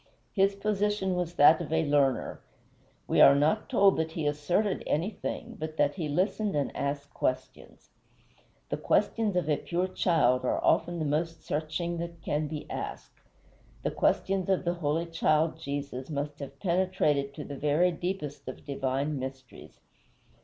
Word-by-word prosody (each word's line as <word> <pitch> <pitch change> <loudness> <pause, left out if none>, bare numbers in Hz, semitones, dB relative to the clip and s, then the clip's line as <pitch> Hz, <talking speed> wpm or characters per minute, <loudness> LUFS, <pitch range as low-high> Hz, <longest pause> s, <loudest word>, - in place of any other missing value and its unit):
His 195 0 +3
position 205 -1 0
was 175 -1 -2
that 155 +2 +6
of - - -6
a 160 0 +2
learner; 140 -3 +1 0.7
we - - +3
are 140 - +9
not 155 - +1
told 200 -7 +4
that 160 0 -1
he 160 -2 -3
asserted 160 +8 0
anything, 210 +7 -3
but 155 0 -5
that 145 0 +3
he 165 -6 -4
listened 195 +5 0
and 140 -3 -1
asked 140 0 -3
questions. 130 0 -4 0.8
The - - -1
questions 210 -1 +1
of 180 -4 0
a 150 -2 +2
pure 180 +2 -1
child 135 -9 +2
are 125 - +1
often 175 0 +2
the 160 - -2
most 165 +3 -1
searching 160 +3 -2
that 170 -1 -6
can 150 +1 -1
be 150 0 -6
asked; - - -6 0.6
the - - 0
questions 190 -1 +1
of 190 -1 +1
the 175 - +1
holy 165 -1 -1
child 160 -1 +1
Jesus 140 -3 -5
must 145 0 -4
have 140 -1 -8
penetrated 170 -7 +1
to 150 - -6
the 145 - -7
very 150 +6 +2
deepest 160 -6 -4
of 130 - -8
divine 140 +1 -1
mysteries. 130 -1 -9
155 Hz, 160 wpm, -29 LUFS, 145-180 Hz, 0.8 s, are